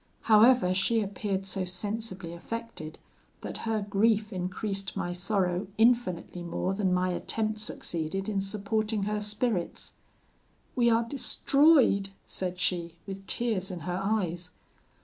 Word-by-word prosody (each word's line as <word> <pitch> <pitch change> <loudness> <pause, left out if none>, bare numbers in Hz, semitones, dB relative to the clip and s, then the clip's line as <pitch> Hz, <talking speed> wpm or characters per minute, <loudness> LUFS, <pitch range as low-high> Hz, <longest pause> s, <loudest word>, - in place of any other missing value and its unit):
However, 220 -3 +5
she 210 +5 +2
appeared 200 -1 -2
so 190 0 -2
sensibly 185 -1 -3
affected, 175 -4 -6 0.4
that - - -4
her 215 -2 0
grief 215 +1 +2
increased 190 +2 -3
my 175 - -2
sorrow 180 0 0
infinitely 220 -7 +2
more 175 +2 -2
than 195 -2 0
my 180 0 +2
attempt 215 +4 -1
succeeded 190 -2 -3
in 200 -2 0
supporting 210 +2 -1
her 210 +1 -1
spirits. 210 -3 -1 0.8
'We 240 -2 +4
are 230 0 +3
destroyed!' 275 -4 +3 0.2
said 185 -1 -4
she, 175 -2 -1
with 195 0 -8
tears 215 -5 0
in 180 -3 -6
her 180 +3 -2
eyes. 180 -4 -1
195 Hz, 130 wpm, -29 LUFS, 180-220 Hz, 0.8 s, However